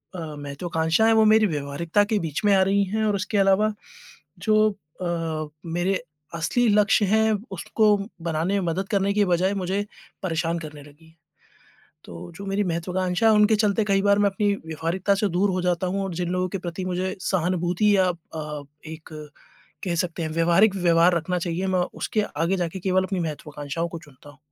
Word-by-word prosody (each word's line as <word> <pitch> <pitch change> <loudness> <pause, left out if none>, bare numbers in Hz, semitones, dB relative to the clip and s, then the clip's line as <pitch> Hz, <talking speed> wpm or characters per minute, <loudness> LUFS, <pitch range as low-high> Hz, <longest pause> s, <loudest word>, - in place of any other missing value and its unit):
अ, - - -5
महत्वाकांक्षाएँ 160 +5 -1
हैं 225 - +4
वो 220 - +5
मेरी 215 0 +5
व्यवहारिकता 160 +5 0
के 210 - +2
बीच 155 -3 -3
में 205 - +5
आ 190 - +4
रही 200 +1 +2
हैं 220 0 +1
और 205 -1 +1
उसके 200 +2 -2
अलावा 195 +2 +3 0.7
जो 215 0 +5 0.3
अ, 165 -3 -2 0.2
मेरे 175 +2 -1 0.3
असली 235 +9 +1
लक्ष्य 210 0 +4
हैं, 220 +2 +3 0.2
उसको 210 +3 +2 0.3
बनाने 165 +3 -1
में 175 - -3
मदद 185 +4 -2
करने 200 -2 +1
की 205 0 +3
बजाय 185 +2 +1
मुझे 195 +2 -2 0.4
परेशान 165 -1 -1
करने 150 -3 -9
लगी 150 +2 -18
हैं। 160 +1 -23 0.9
तो 85 - -9
जो 200 - -8
मेरी 195 +1 0
महत्वाकांक्षा 180 +4 0
हैं 220 - +6
उनके 210 +1 +5
चलते 210 0 +2
कई 195 -1 +2
बार 200 0 +4
मैं 205 - +4
अपनी 205 +1 0
व्यवहारिकता 165 +5 -1
से 205 +1 +1
दूर 190 +3 +1
हो 185 - -1
जाता 180 0 0
हूँ 195 +2 -1
और 190 -2 -4
जिन 175 0 -2
लोगों 185 0 0
के 195 - -3
प्रति 175 +1 -5
मुझे 185 +1 -2
सहानुभूति 180 +3 +1
या 190 -1 +4
अ, 155 -3 -6 0.2
एक 160 0 -10 0.8
कह 175 - -1
सकते 170 0 -2
हैं 160 - -2
व्यावहारिक 170 +6 +3
व्यवहार 175 -1 +4
रखना 180 +2 -1
चाहिए, 175 +2 -2
मैं 185 -1 +1 0.2
उसके 215 - -1
आगे 170 0 -1
जाके 175 0 -3
केवल 185 0 +1
अपनी 190 -1 -2
महत्वाकांक्षाओं 150 0 -4
को 170 - -7
चुनता 145 -2 -16
हूँ। 145 - -20
180 Hz, 190 wpm, -24 LUFS, 165-200 Hz, 0.9 s, हैं